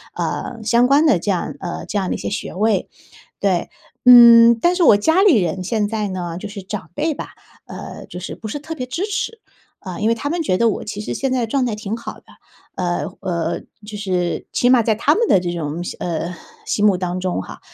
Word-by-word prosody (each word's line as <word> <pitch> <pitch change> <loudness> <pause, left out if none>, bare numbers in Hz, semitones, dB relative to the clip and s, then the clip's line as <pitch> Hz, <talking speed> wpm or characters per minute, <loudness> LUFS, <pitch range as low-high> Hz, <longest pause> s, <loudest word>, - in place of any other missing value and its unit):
呃， 230 -2 -4
相 235 +3 +3
关 285 +4 +4
的 230 - +4
这 205 - -4
样 185 -3 -1
呃， 180 - -5
这 205 - -2
样 190 - -2
的 - - -1
一 - - -4
些 - - -4
学 200 - -5
位， 205 0 +1 0.5
对。 190 -3 0 0.4
嗯， 235 -1 +9
但 345 +8 +2
是 360 - 0
我 215 -11 +7
家 320 - +2
里 370 - +5
人 185 0 -1
现 210 +2 0
在 210 -1 -2
呢 175 -2 -5
就 205 - -7
是 200 -1 -8
长 195 -3 -6
辈 315 - 0
吧， - - -7 0.3
呃， - - -9
就 180 - -9
是 185 - -6
不 220 - -8
是 290 - -4
特 320 +3 -7
别 250 -4 -5
支 330 +10 -3
持， 420 +2 -3 0.4
啊， 185 -2 -7
因 215 - +1
为 230 - +3
他 285 +6 -4
们 340 -1 -1
觉 185 -11 +1
得 230 +1 +3
我 - - -4
其 210 0 -6
实 - - -4
现 270 -1 -2
在 255 -2 0
状 260 +2 0
态 220 -3 -2
挺 210 0 -4
好 230 - -7
的， - - -19 0.5
呃 175 -1 -1 0.2
呃， 170 -2 -2 0.3
就 210 -1 -7
是 180 -3 -2
起 245 - +2
码 250 -2 +5
在 220 0 +1
他 280 +8 +2
们 460 0 +1
的 185 - +5
这 175 -1 -3
种 165 +1 -4
心 - - -5
呃， 170 +1 -3 0.3
心 210 0 +1
目 195 -3 +4
当 180 0 -3
中 180 - -2
哈， - - -11
210 Hz, 255 characters per minute, -20 LUFS, 185-250 Hz, 0.5 s, 嗯